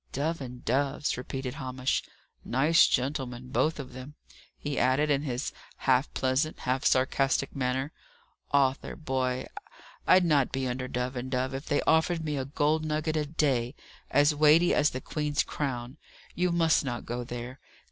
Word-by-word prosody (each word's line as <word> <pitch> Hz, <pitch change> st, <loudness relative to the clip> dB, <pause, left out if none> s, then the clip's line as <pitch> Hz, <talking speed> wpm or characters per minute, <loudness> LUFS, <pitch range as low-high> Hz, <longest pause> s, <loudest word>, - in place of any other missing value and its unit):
"Dove 155 Hz, +3 st, -1 dB
and 125 Hz, -1 st, -8 dB
Dove's," 140 Hz, +4 st, 0 dB
repeated 130 Hz, +1 st, -5 dB
Hamish. 130 Hz, -3 st, -1 dB, 0.4 s
"Nice 155 Hz, +7 st, +4 dB
gentlemen, 125 Hz, -2 st, -2 dB
both 160 Hz, -, +1 dB
of 130 Hz, -3 st, -7 dB
them!" 130 Hz, +4 st, -9 dB, 0.4 s
he 145 Hz, -1 st, -3 dB
added, 135 Hz, +4 st, +2 dB
in 140 Hz, -1 st, +2 dB
his 130 Hz, -2 st, -3 dB, 0.2 s
half 130 Hz, +2 st, +2 dB
pleasant, 135 Hz, +4 st, 0 dB
half 130 Hz, +1 st, -1 dB
sarcastic 135 Hz, +1 st, +2 dB
manner. 130 Hz, +2 st, -1 dB, 0.6 s
"Arthur, 135 Hz, -1 st, +1 dB
boy, 130 Hz, -4 st, -2 dB, 0.6 s
I'd 185 Hz, -1 st, +6 dB
not 145 Hz, -5 st, +3 dB
be 135 Hz, -1 st, -1 dB
under 125 Hz, +1 st, -3 dB
Dove 125 Hz, +1 st, -3 dB
and 125 Hz, +1 st, -4 dB
Dove 130 Hz, +1 st, -1 dB
if 135 Hz, +2 st, -6 dB
they 145 Hz, -, +1 dB
offered 160 Hz, +1 st, +2 dB
me 150 Hz, -1 st, -1 dB
a 135 Hz, -2 st, -2 dB
gold 150 Hz, +2 st, +1 dB
nugget 155 Hz, +1 st, -1 dB
a 150 Hz, -1 st, 0 dB
day, 135 Hz, -4 st, 0 dB, 0.3 s
as 145 Hz, +1 st, +4 dB
weighty 155 Hz, +4 st, +5 dB
as 150 Hz, -, +4 dB
the 130 Hz, -, -5 dB
Queen's 150 Hz, 0 st, -1 dB
crown. 130 Hz, -2 st, -4 dB, 0.4 s
You 180 Hz, 0 st, +1 dB
must 165 Hz, -2 st, +3 dB
not 120 Hz, -3 st, -4 dB
go 120 Hz, +1 st, -3 dB
there." 120 Hz, +2 st, -7 dB
135 Hz, 160 wpm, -28 LUFS, 130-150 Hz, 0.6 s, I'd